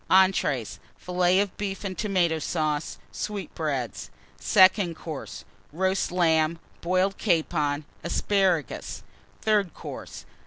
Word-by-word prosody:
ENTREES. 185 - +3 0.2
Fillets 180 +2 +2
of 200 - -9
Beef 195 -1 -4
and 190 -2 -3
Tomato 180 -6 +1
Sauce. 155 -1 -1
Sweetbreads. 155 - -4 0.3
SECOND 185 -2 +5
COURSE. 135 -12 -7 0.3
Roast 190 +3 0
Lamb. 165 -2 +2 0.2
Boiled 185 +3 +1
Capon. 155 -5 +1 0.2
Asparagus. 180 - 0 0.4
THIRD 205 -6 +2
COURSE. - - -8
175 Hz, 95 wpm, -26 LUFS, 155-190 Hz, 0.4 s, SECOND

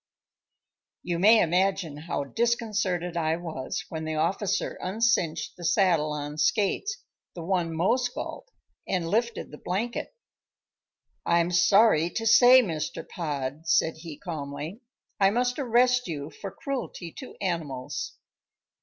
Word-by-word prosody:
You 170 -1 -2
may 220 +4 +7
imagine 180 -2 +1
how 150 0 -3
disconcerted 205 - -1
I 160 -1 +1
was 160 -6 -5
when 160 -1 -5
the 155 0 -3
officer 185 +6 -1
uncinched 185 -5 0
the 175 - -10
saddle 170 -3 +2
on 150 0 -5
Skates, 240 - 0 0.3
the 170 - -6
one 175 -2 0
most 245 +9 +1
galled, - - -6 0.4
and 180 -3 -1
lifted 230 +6 -1
the 150 - -10
blanket. 230 - -3 1.1
"I 170 - +3
am 170 +1 +1
sorry 175 -1 +5
to 225 +5 -4
say, 245 +3 +8
Mr. 155 -6 -4
Pod," 150 -1 -4
said 160 0 +2
he 160 -2 -9
calmly, 155 - -6 0.4
"I 195 -1 +5
must 245 +5 0
arrest 250 -1 +3
you 150 -2 -5
for 195 +6 -7
cruelty 195 - -5
to 260 - -9
animals." 150 -7 -3
175 Hz, 130 wpm, -27 LUFS, 160-225 Hz, 1.1 s, say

